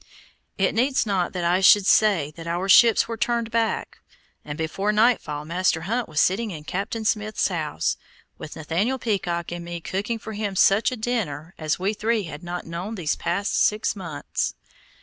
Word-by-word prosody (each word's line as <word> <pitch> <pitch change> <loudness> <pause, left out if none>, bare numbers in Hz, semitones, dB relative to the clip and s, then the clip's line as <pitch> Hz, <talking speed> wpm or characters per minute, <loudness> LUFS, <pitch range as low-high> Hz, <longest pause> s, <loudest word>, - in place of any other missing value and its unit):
It 190 - +1
needs 260 +4 +2
not 190 -4 -1
I 175 +1 +1
should 195 +1 +7
say 190 -9 +3
that 165 0 -9
our 175 +3 -2
ships 230 +3 +6
were 230 - -4
turned 235 0 -1
back, 230 -1 -1 0.4
and 145 0 -6
before 195 +6 -1
nightfall 210 -10 +1
Master 170 0 0
Hunt 230 +8 -2
was 155 -1 -1
sitting 215 +7 +2
in 155 -6 -7
Captain 205 +7 -4
Smith's 215 0 0
house, 155 - -2 0.4
with 155 - -8
Nathaniel 175 - -1
Peacock 175 -8 -2
and 175 0 -5
me 170 0 -6
cooking 200 +7 -3
for 220 0 -8
him 205 -2 -3
such 195 +5 +4
a 255 - -4
dinner 190 -9 -3
as 155 -1 -1
we 195 +3 -1
three 220 +1 0
had 160 -3 -8
not 175 0 -5
known 175 +7 -5
these 165 -7 -1 0.3
six 210 +1 +1
months 165 -7 -3
past. - - -41
195 Hz, 175 wpm, -24 LUFS, 170-220 Hz, 0.4 s, should